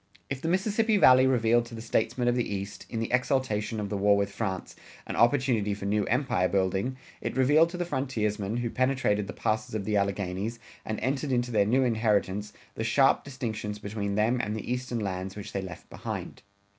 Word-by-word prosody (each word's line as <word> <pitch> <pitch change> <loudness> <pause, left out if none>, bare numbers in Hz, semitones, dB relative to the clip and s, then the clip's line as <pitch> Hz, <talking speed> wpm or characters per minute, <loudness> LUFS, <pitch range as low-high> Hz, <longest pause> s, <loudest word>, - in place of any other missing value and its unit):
If 135 -1 -3
the - - -3
Mississippi 210 +5 +2
Valley 130 -6 +7
revealed 120 -2 +3
to 115 - -9
the - - -7
statesmen 115 +2 0
of 120 - +4
the 120 -4 -1
East, 100 +1 -6
in 115 - -3
the 115 - -2
exultation 125 -4 0
of 105 -1 -3
the 105 - -2
war 100 +1 +4
with 100 0 0
France, 95 -3 -4 0.3
an - - -5
opportunity 120 -4 +2
for 100 - -7
new 105 0 +1
empire 125 -8 +1
building, 95 +6 0 0.2
it - - -3
revealed 150 +5 +5
to 180 - -6
the 175 - -1
frontiersmen, 115 - -1
who 120 -1 -2
penetrated 130 -6 +1
the 95 - -6
passes 110 0 -2
of 100 -2 -2
the 105 0 +1
Alleghanies, 100 +2 -1 0.3
and 110 -1 -3
entered 135 +3 -1
into 120 -1 0
their 105 -3 +3
new 130 +4 +3
inheritance, 105 -4 +1 0.2
the 110 - -4
sharp 135 +4 +3
distinctions 115 -6 -4
between 100 -1 -3
them 115 +4 +2
and 105 -2 -3
the 110 +2 -5
Eastern 125 -1 -3
lands 95 -2 -3
which 105 -1 -7
they 100 - -1
left 95 -2 -9
behind. - - -6
110 Hz, 200 wpm, -28 LUFS, 100-130 Hz, 0.3 s, Valley